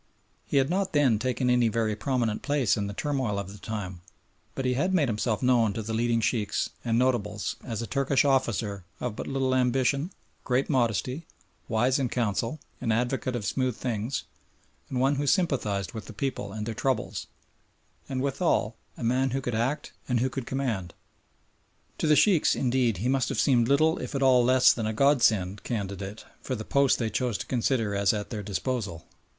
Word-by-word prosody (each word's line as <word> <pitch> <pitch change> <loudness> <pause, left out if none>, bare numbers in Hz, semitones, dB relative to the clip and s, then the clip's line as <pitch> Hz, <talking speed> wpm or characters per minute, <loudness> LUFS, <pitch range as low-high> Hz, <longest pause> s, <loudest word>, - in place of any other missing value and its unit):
He - - 0
had 135 -1 +4
not 195 +1 0
then 135 -8 +3
taken 125 +1 -1
any 125 -1 +4
very 110 -1 0
prominent 120 -2 -1
place 140 -7 +1
in 100 -2 -2
the 100 - -5
turmoil 130 -8 -1
of 100 -1 -4
the 105 - -12
time, 95 -5 -5 0.5
but 135 - -3
he 125 - +2
had 185 +9 +1
made 150 -6 +3
himself 110 0 -1
known 120 -4 +3
to 110 - -4
the 110 +2 -4
leading 115 0 +1
Sheikhs 105 -1 0
and 115 -1 +1
notables 110 -5 0
as 115 -2 -4
a - - -3
Turkish 140 +2 +1
officer 115 -8 0 0.2
of 120 -4 -3
but - - -5
little 135 -1 0
ambition, 130 +4 +1 0.3
great 130 +1 0
modesty, 125 - 0 0.4
wise 125 +4 +2
in 130 -3 0
council, 115 +4 -1 0.2
an 115 -3 -1
advocate 125 +2 0
of 110 -4 -3
smooth 130 0 0
things, 120 +1 -2 0.7
and 125 - -2
one 135 +2 +2
who 145 +1 -1
sympathised 125 - +1
with 110 -2 -6
the - - -9
people 105 -2 -3
and 105 +1 -4
their 115 - -3
troubles, 130 +1 -2 0.8
and 130 -1 -2
withal 135 - 0 0.2
a - - -6
man 130 +3 +2
who 135 +2 -1
could 125 -2 -3
act 130 +7 -1 0.2
and 125 -2 +2
who 130 +2 0
could 130 -2 -5
command. 115 -10 -2 1.0
To - - +1
the 155 - +6
Sheikhs, 160 +3 +4
indeed, 125 -4 +1
he 110 +8 -2
must 130 -1 +1
have - - -2
seemed 120 -4 +3
little 155 +4 +3
if - - -5
at 135 - +1
all 130 -2 +5
less 130 +1 +6
than 110 -3 -2
a 110 - -1
God 140 +3 +3
sent 100 -3 +2
candidate 100 -1 -4 0.2
for 130 - -3
the 110 -2 -6
post 140 -1 +3
they 115 -2 -2
chose 120 0 0
to - - -5
consider 120 -4 0
as 100 0 +2
at 105 +2 -4
their 110 -3 -3
disposal. 100 -3 -3
125 Hz, 195 wpm, -27 LUFS, 110-135 Hz, 1.0 s, the